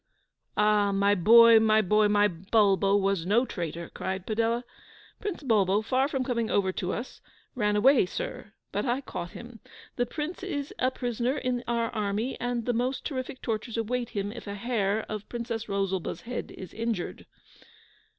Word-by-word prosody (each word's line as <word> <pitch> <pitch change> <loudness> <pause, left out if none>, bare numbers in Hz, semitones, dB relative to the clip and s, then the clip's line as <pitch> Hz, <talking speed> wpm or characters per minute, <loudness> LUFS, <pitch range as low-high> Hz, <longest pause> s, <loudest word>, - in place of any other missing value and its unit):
'Ah! 210 -1 +3
my 200 +1 +3
boy, 230 +4 +8
my 220 0 +4
boy, 210 +1 +3
my 205 0 +4
Bulbo 195 +2 +2
was 195 -3 0
no 215 +8 +3
traitor!' 170 -6 -5
cried 190 0 -4
Padella. 230 +2 0 0.6
'Prince 405 -7 -4
Bulbo, 210 -4 +2
far 260 +4 +1
from 270 -3 -1
coming 235 -3 -1
over 190 -2 +2
to 185 0 -3
us, 240 +3 -6 0.3
ran 210 -4 +1
away, 245 -1 +5
sir; - - -6 0.2
but - - -1
I 255 +1 0
caught 175 -9 -6
him. 235 -1 -10 0.4
The 245 -1 +1
Prince 310 +4 -5
is 295 -7 -4
a 255 - +3
prisoner 245 +1 -2
in 250 -3 -2
our 235 -1 0
army, 215 +3 -2
and 245 -1 -2
the 245 - +1
most 250 +3 -1
terrific 260 -2 -5
tortures 225 0 -3
await 240 +2 -1
him 205 -2 -3
if 235 -1 -9
a 200 - -4
hair 215 -1 -1
of 215 -1 -4
the - - -31
Princess 235 -2 -4
Rosalba's 195 -3 -2
head 245 +1 -5
is 185 - -10
injured. 225 -5 -3
225 Hz, 170 wpm, -28 LUFS, 200-245 Hz, 0.6 s, boy